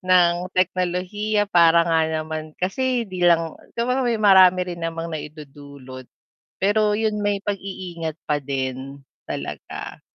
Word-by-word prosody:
ng 180 Hz, -1 st, +3 dB
teknolohiya 185 Hz, +4 st, 0 dB
para 170 Hz, -4 st, +5 dB
nga 165 Hz, -1 st, +2 dB
naman 155 Hz, 0 st, -4 dB
kasi 245 Hz, +6 st, -1 dB
'di 185 Hz, -4 st, -7 dB
lang 165 Hz, -2 st, +2 dB, 0.2 s
siyempre 250 Hz, +3 st, 0 dB
may 235 Hz, -, +1 dB
marami 190 Hz, -3 st, +6 dB
rin 170 Hz, -, -9 dB
namang 165 Hz, 0 st, -4 dB
naidudulot, 140 Hz, -4 st, -9 dB, 0.5 s
pero 210 Hz, +1 st, +2 dB
yun 215 Hz, -1 st, -1 dB
may 205 Hz, -1 st, 0 dB
pag-i-ingat 185 Hz, -5 st, -5 dB
pa 150 Hz, -1 st, 0 dB
din 135 Hz, 0 st, -4 dB, 0.3 s
talaga. -, -, -6 dB
175 Hz, 125 wpm, -22 LUFS, 155-205 Hz, 0.5 s, marami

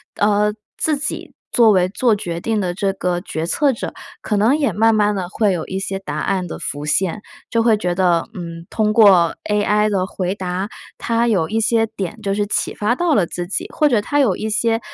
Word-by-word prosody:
呃， 210 Hz, 0 st, +2 dB, 0.2 s
自 310 Hz, -, +1 dB
己 285 Hz, +1 st, -5 dB, 0.2 s
作 230 Hz, -2 st, +5 dB
为 185 Hz, -2 st, +3 dB
做 225 Hz, +3 st, +2 dB
决 170 Hz, -4 st, -4 dB
定 220 Hz, +2 st, -1 dB
的 175 Hz, -1 st, -2 dB
这 195 Hz, 0 st, -1 dB
个 180 Hz, -2 st, -1 dB
决 165 Hz, -3 st, -4 dB
策 275 Hz, -, +2 dB
者， -, -, -5 dB, 0.3 s
可 210 Hz, -, -1 dB
能 225 Hz, +8 st, +4 dB
也 280 Hz, -7 st, +1 dB
慢 225 Hz, +3 st, +3 dB
慢 210 Hz, -1 st, +2 dB
地 190 Hz, -3 st, -3 dB
会 210 Hz, +2 st, +1 dB
有 170 Hz, -4 st, -2 dB
一 190 Hz, -, -4 dB
些 195 Hz, 0 st, -3 dB
答 150 Hz, -6 st, -6 dB
案 185 Hz, +1 st, -1 dB
的 -, -, -6 dB
浮 145 Hz, +1 st, -5 dB
现， 190 Hz, +6 st, 0 dB, 0.3 s
就 230 Hz, -, +1 dB
会 225 Hz, -1 st, +4 dB
觉 180 Hz, -4 st, -1 dB
得， 175 Hz, -2 st, +1 dB
嗯， 170 Hz, -4 st, -7 dB
通 215 Hz, -1 st, 0 dB
过 190 Hz, -7 st, +5 dB, 0.2 s
AI 210 Hz, +1 st, +2 dB
的 190 Hz, -3 st, 0 dB
回 185 Hz, -1 st, -2 dB
答， 185 Hz, +1 st, -4 dB, 0.3 s
它 230 Hz, 0 st, 0 dB
有 190 Hz, -8 st, +1 dB
一 225 Hz, +1 st, 0 dB
些 225 Hz, 0 st, +2 dB
点 195 Hz, +1 st, -6 dB
就 200 Hz, -2 st, -1 dB
是 205 Hz, 0 st, -1 dB
启 -, -, -1 dB
发 215 Hz, +4 st, 0 dB
到 345 Hz, +2 st, +1 dB
了 200 Hz, -9 st, +3 dB
自 175 Hz, +1 st, -5 dB
己， 195 Hz, -, -2 dB
或 300 Hz, -, +3 dB
者 235 Hz, -5 st, +3 dB
它 290 Hz, +7 st, -1 dB
有 215 Hz, -9 st, +2 dB
一 220 Hz, -, -3 dB
些 225 Hz, +1 st, +1 dB
205 Hz, 240 characters per minute, -19 LUFS, 180-225 Hz, 0.3 s, 作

